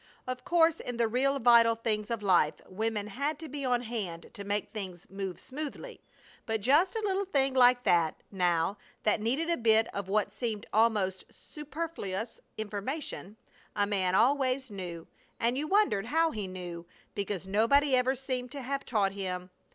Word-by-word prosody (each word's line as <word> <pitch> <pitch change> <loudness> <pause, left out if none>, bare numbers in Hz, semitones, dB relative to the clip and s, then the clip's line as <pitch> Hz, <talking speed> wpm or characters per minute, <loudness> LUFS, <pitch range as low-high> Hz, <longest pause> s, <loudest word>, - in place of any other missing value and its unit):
Of 255 0 -4
course 330 0 +3
in 245 -1 -5
the 235 -1 +2
real 270 +5 +1
vital 230 -2 +6
things 215 -2 -2
of 230 -3 -3
life 175 -6 +4
women 210 +2 -2
had 280 +9 -2
to 320 - -8
be 285 0 -5
on 245 -2 +1
hand 205 -8 -5
to 200 -3 -7
make 205 +1 -2
things 190 -5 -7
move 195 -2 -5
smoothly, 305 - -7 0.5
but 225 -1 0
just 305 - +4
a 445 - -2
little 395 0 0
thing 275 -7 +1
like 250 -1 +5
that, 170 -6 +3 0.2
now, 180 0 +1 0.2
that 210 0 +2
needed 275 +10 0
a 335 - +1
bit 225 -1 +4
of 200 -2 -4
what 205 0 +1
seemed 220 -3 -3
almost 210 -4 +2
superfluous 300 - -6 0.2
information, 215 +1 -4 0.4
a 205 -1 +2
man 190 -3 +1
always 260 +1 +2
knew; 175 -4 -6 0.3
and 235 +2 +1
you 295 +3 -2
wondered 380 - +2
how 325 +3 +2
he 210 -6 -4
knew, 175 -2 -7 0.3
because 200 -2 -3
nobody 260 +8 +4
ever 255 +1 +2
seemed 255 -1 -3
to 280 -2 -6
have 275 +2 -2
taught 205 -5 +1
him! 185 -2 -5
225 Hz, 170 wpm, -30 LUFS, 195-270 Hz, 0.5 s, vital